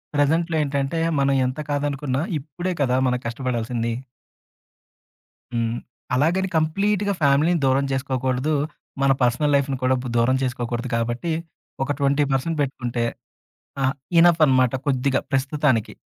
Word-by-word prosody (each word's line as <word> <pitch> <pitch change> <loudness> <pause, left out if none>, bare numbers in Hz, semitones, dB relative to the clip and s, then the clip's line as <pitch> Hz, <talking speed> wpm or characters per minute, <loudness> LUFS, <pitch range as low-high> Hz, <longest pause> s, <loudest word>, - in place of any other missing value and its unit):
ప్రెజెంట్‌లో 160 +3 +2
ఏంటంటే, 140 +2 -1 0.2
మనం 140 0 +2
ఎంత 130 +4 -5
కాదనుకున్నా 145 -1 -1 0.2
ఇప్పుడే 175 +6 -4
కదా 125 -1 +1
మనం 125 0 0
కష్టపడాల్సింది. 120 -1 -2 1.6
హ్మ్. 115 0 -1 0.4
అలాగని 175 +8 +1
కంప్లీట్‌గా 200 +6 +1
ఫ్యామిలీ‌ని 150 +5 +3
దూరం 135 +1 +3
చేసుకోకూడదు. 130 +1 -1 0.5
మన 140 0 +4
పర్సనల్ 125 +4 +2
లైఫ్‌ని 140 -1 +1
కూడా 130 +1 +3 0.2
దూరం 125 +3 +3
చేసుకోకూడదు 120 -1 -3
కాబట్టి, 120 +8 -1 0.5
ఒక 135 - -2
20% 140 +2 +1
పెట్టుకుంటే, 125 -3 -2 0.8
ఆ! - - +3 0.3
ఇనఫ్ 170 -1 +6
అన్నమాట 130 -2 +3
కొద్దిగా 135 -1 +1
ప్రస్తుతానికి. 135 -3 +1
135 Hz, 110 wpm, -23 LUFS, 125-150 Hz, 1.6 s, ఇనఫ్